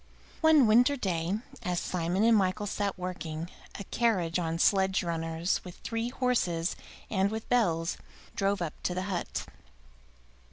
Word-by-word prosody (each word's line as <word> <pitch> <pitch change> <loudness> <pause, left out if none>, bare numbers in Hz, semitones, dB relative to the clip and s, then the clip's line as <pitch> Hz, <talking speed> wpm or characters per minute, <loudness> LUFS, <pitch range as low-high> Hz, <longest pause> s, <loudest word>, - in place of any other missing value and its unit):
One 315 -4 +6
winter 245 +6 +5
day, 180 -3 -1 0.2
as 180 -5 -1
Simon 180 +3 -1
and 230 0 +6
Michael 200 +1 +1
sat 200 -1 -2
working, 175 -2 -5 0.3
a 200 - -5
carriage 185 -7 +1
on 165 -1 -1
sledge 190 +1 +3
runners, 165 0 -1
with 180 -2 -9
three 230 +1 -2
horses 210 -10 0 0.4
and 195 -2 +2
with 220 +1 -5
bells, 170 -9 +1 0.4
drove 195 -2 +1
up 155 - -3
to 180 - -1
the 185 - -1
hut. 175 - -3
190 Hz, 145 wpm, -29 LUFS, 170-220 Hz, 0.4 s, One